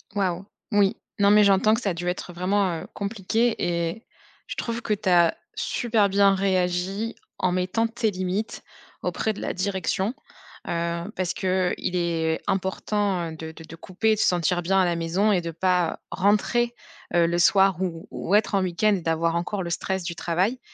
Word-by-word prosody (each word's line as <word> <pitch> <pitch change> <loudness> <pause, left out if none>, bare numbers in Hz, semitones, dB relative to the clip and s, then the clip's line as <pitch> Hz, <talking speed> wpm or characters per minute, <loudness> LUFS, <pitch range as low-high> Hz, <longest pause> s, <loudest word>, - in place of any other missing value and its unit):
Waouh, 190 -2 -1 0.3
oui, 205 -2 +3 0.2
non, 200 0 +5
mais 210 0 +7
j'entends 200 +2 +4
que 230 - 0
ça 205 - 0
a 180 - -1
dû 175 +1 -4
être, 180 0 -3
heu, - - -13
vraiment, 185 -1 0
heu, - - -9
compliqué 220 +3 0
et 170 +4 -2 0.4
je - - -5
trouve 235 0 -3
que 215 - 0
tu 195 -2 -1
as 170 -2 +5 0.2
super 225 -4 +1
bien 195 0 +4
réagi 190 +3 0 0.2
en 185 - +1
mettant 185 +6 0
tes 225 -2 -1
limites 185 +3 -3 0.4
auprès 220 - -1
de - - -9
la - - -2
direction, 190 +2 -1 0.5
heu, 170 +3 -2
parce 185 -1 -1
qu'il 185 -1 -1
est 165 -2 0
important, 190 -2 -1
heu, - - -8
de 160 0 -7
de 160 0 -12
te 160 - -10
couper, 190 +6 0
de 215 - -2
se - - +3
sentir 175 0 +1
bien 190 +3 +2
à 185 - +4
la 170 -1 +1
maison 175 +6 +1
et 180 -3 +2
de 170 - -4
pas, 180 0 +1
heu, - - -12
rentrer, 215 +5 +1 0.4
heu, 170 -1 +5
le 170 +1 0
soir 190 0 +4
ou 165 -3 -3
ou 195 +5 0
être 210 0 +2
en 195 - +3
week-end 185 +4 +2
d'avoir 165 +1 +1
encore 185 +3 -2
le 170 - -4
stress 190 +1 -2
du 170 0 -3
travail 185 +9 0
185 Hz, 195 wpm, -25 LUFS, 175-205 Hz, 0.5 s, mais